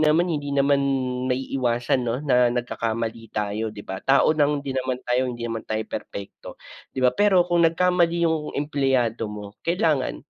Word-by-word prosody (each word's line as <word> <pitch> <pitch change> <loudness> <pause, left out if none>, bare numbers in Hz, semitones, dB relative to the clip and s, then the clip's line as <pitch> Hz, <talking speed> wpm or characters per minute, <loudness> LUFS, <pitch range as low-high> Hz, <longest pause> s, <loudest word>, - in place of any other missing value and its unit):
naman, 155 +3 +3
hindi 145 -3 -2
naman 140 0 +3 0.6
maiiwasan 125 -1 0
'no, 120 +3 -1
na 125 -4 +3
nagkakamali 115 -2 -3
tayo, 105 +1 -2
'di 105 - -9
ba? 95 0 -6
Tao 140 +3 +4
lang 145 -1 +2
hindi 135 -1 -5
naman 130 -1 -2
tayo, 125 +1 +1
hindi 120 -2 -4
naman 115 -1 -4
tayo 110 0 -2
perpekto, 100 -2 -8 0.3
'di 130 - -4
ba? 125 - +5
Pero, 200 -3 +4
kung 175 -1 +3
nagkamali 170 0 +2
yung 155 -2 -2
empleyado 135 -6 0
mo 105 0 -9
kailangan, 155 - 0
130 Hz, 165 wpm, -24 LUFS, 115-150 Hz, 0.6 s, ba